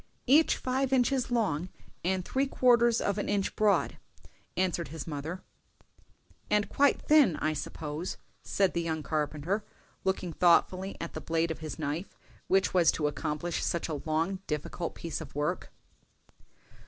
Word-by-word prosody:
"Each 295 +5 +5
five 260 +1 -1
inches 260 0 +2
long, 190 -8 0 0.3
and 185 0 0
three 270 +1 0
quarters 240 -3 +4
of 200 0 0
an - - -2
inch 200 -1 0
broad," 210 -1 +2 0.6
answered 180 -2 0
his 155 +1 -7
mother. 160 +4 -5 1.1
"And 210 -1 +2
quite 285 0 +3
thin, 295 - +5
I 155 +1 0
suppose," 150 +3 -5 0.2
said 195 -2 +1
the 170 - 0
young 160 -2 -2
carpenter, 155 +7 -1 0.4
looking 185 -3 -1
thoughtfully 185 +3 +3
at 170 - -5
the - - -5
blade 165 0 0
of 160 - -5
his 155 -1 -6
knife 155 +4 -4 0.3
which 190 0 +2
was 175 -3 +5
to 150 - -1
accomplish 150 +3 -2
such 170 - -1
a 150 -3 -3
long, 165 +4 0
difficult 150 +3 -3
piece 165 - -4
of - - -10
work. 145 +1 -2
175 Hz, 150 wpm, -30 LUFS, 155-205 Hz, 1.1 s, Each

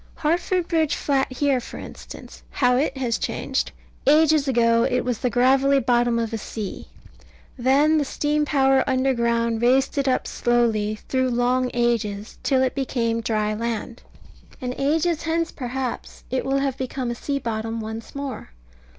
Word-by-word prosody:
Hartford 345 +3 0
Bridge 320 -3 +1
Flat 270 -2 0
here, 270 0 +1
for 240 - -9
instance, - - -10
how 250 -2 +2 0.2
has 250 -4 -1
it - - -18
changed! - - -2 0.4
Ages 305 0 +5
ago 230 -2 +3
it 250 - +1
was 245 -3 -1
the 250 - 0
gravelly 265 +3 +4
bottom 240 -2 +2
of 230 -1 -2
a 225 - -2
sea. 210 -2 -6 0.7
Then 280 +5 +3
the - - +1
steam 295 +2 0
power 270 -2 +3
underground 235 -3 +1
raised 265 +4 +2
it 275 - 0
up 255 - +1
slowly, 225 -3 +1
through 260 -1 +1
long 250 +1 +1
ages, 220 -3 -1
till 260 -2 +2
it 260 - 0
became 235 -4 -1
dry 215 -2 0
land. 230 +2 -4 0.6
And 250 -3 -3
ages 315 +3 +1
hence, 330 0 -1
perhaps, 255 -1 -5
it 260 - -1
will 270 +1 +1
have 275 -1 -1
become 255 -1 -3
a - - -1
sea 280 +4 -3
bottom 225 -2 -3
once 220 +2 -7
more. 280 - -5
255 Hz, 160 wpm, -23 LUFS, 235-275 Hz, 0.7 s, Ages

